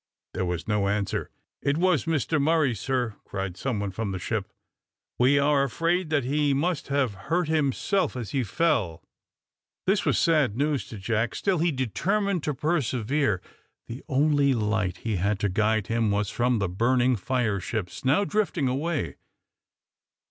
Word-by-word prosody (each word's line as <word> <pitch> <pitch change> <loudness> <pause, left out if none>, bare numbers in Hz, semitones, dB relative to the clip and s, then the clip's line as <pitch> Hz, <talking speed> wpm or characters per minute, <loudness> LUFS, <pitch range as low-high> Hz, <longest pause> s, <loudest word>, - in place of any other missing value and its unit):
There 90 - -1
was 90 -1 -3
no 105 -2 +1
answer. 100 0 -1 0.3
"It 140 +1 +1
was 180 -3 +2
Mr 160 -1 0
Murray, 155 -3 +3
sir," 120 -1 -2
cried 95 -2 -4
some 125 0 -2
one 100 -1 -2
from 100 +1 -3
the 95 - -3
ship. 90 - -3 0.7
"We 130 +3 +5
are 140 0 +3
afraid 165 +6 0
that 150 -4 +1
he 145 +2 +1
must 165 +2 -1
have 135 -5 +1 0.2
hurt 175 0 +1
himself 160 +4 +1
as 115 -6 -5
he 135 -2 0
fell." 110 - 0 0.8
This 195 +2 +2
was - - +2
sad 150 - +2
news 145 -1 0
to 110 - -8
Jack. 115 +3 -1
Still 190 -4 0
he 170 +1 +2
determined 180 - 0
to 150 - -1
persevere. 135 - 0 0.4
The 120 +4 -7
only 140 -1 +3
light 105 -4 0
he 110 -3 -2
had 100 +4 0
to 105 - +1
guide 110 +2 +1
him 115 0 0
was 100 0 0
from 125 0 +1
the 100 -3 0
burning 120 +7 +2
fire 110 -1 0
ships 105 +1 -4
now 140 +9 +3
drifting 195 -8 0
away. 145 +5 -2
130 Hz, 165 wpm, -26 LUFS, 105-155 Hz, 0.8 s, We